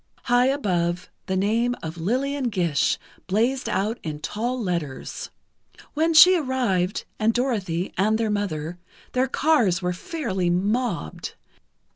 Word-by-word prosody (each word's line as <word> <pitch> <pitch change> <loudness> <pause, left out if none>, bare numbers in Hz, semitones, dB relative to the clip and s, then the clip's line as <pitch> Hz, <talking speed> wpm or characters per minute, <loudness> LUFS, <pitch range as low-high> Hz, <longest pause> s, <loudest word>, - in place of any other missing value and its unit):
High 245 +1 +3
above, 180 -10 0 0.2
the 190 - 0
name 230 +5 +1
of 160 0 -5
LILLIAN 260 +9 -1
GISH 175 -10 +1 0.3
blazed 235 +7 +1
out 215 +5 -1
in 150 -2 -5
tall 240 +10 -2
letters. 170 - -4 0.6
When 320 +2 +1
she 365 +4 +9
arrived, 245 - 0
and 220 +1 +2
Dorothy, 200 -9 -1
and 215 +3 +3
their 220 -2 0
mother, 175 -5 -3 0.3
their 255 +1 +1
cars 245 - +2
were 180 -1 -1
fairly 190 - -2
mobbed. 195 - -1
210 Hz, 125 wpm, -24 LUFS, 180-255 Hz, 0.6 s, she